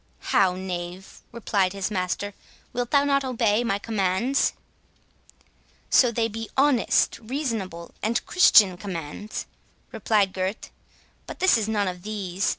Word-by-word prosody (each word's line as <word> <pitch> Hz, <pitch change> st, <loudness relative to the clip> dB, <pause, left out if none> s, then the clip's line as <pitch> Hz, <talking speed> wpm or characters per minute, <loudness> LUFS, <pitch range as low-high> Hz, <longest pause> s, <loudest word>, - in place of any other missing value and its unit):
"How, 190 Hz, -2 st, +4 dB
knave," 180 Hz, 0 st, -6 dB
replied 200 Hz, -5 st, 0 dB
his 195 Hz, +1 st, -3 dB
master, 195 Hz, +1 st, -2 dB, 0.4 s
"wilt 245 Hz, -1 st, -2 dB
thou 285 Hz, -1 st, +4 dB
not 275 Hz, -1 st, +2 dB
obey 230 Hz, -3 st, +1 dB
my 200 Hz, -4 st, 0 dB
commands?" 210 Hz, +5 st, 0 dB, 1.4 s
"So 245 Hz, -3 st, +5 dB
they 230 Hz, 0 st, 0 dB
be 225 Hz, 0 st, -6 dB
honest, 275 Hz, -3 st, +3 dB
reasonable, 220 Hz, -, -4 dB
and 230 Hz, +2 st, -1 dB
Christian 205 Hz, -, +5 dB
commands," 185 Hz, +2 st, -6 dB, 0.5 s
replied 205 Hz, -4 st, +1 dB
Gurth; 190 Hz, +2 st, -4 dB, 0.6 s
"but -, -, -8 dB
this 375 Hz, -, +4 dB
is 220 Hz, -2 st, 0 dB
none 205 Hz, -2 st, 0 dB
of 180 Hz, -1 st, -5 dB
these. 195 Hz, -2 st, -2 dB
210 Hz, 130 wpm, -25 LUFS, 185-235 Hz, 1.4 s, So